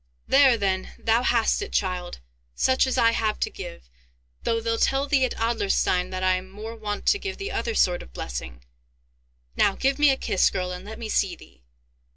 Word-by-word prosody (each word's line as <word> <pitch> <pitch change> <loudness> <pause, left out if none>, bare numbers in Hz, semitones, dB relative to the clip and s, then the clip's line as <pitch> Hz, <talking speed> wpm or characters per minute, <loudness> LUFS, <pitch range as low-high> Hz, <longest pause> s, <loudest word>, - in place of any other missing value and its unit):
There 270 -3 +5
then, 190 -3 -2
thou 225 +1 +2
hast 235 - +2
it, 405 - -5
child, 180 - -2 0.3
such 260 0 +2
as 260 - -1
I 230 -2 +5
have 220 -2 -1
to - - 0
give, - - -9 0.5
though 230 - 0
they'll 230 0 -1
tell 270 +1 +2
thee 280 -2 +2
at 255 - -4
Adlerstein 205 -5 +1
that 185 0 -4
I 185 0 +3
am 185 +1 -9
more 215 +4 -8
wont 210 -2 -5
to 405 - +3
give 390 -1 -5
the 400 +2 -5
other 465 - -2
sort 180 - +2
of - - -13
blessing! - - -6 0.9
Now, 195 - +3
give 270 +2 0
me 295 -1 +6
a 270 - +2
kiss, 190 - +2
girl, 180 -1 -3
and 180 +1 -7
let 220 +1 -8
me 230 - -6
see 195 -4 0
thee! 65 -1 -18
220 Hz, 200 wpm, -25 LUFS, 185-260 Hz, 0.9 s, me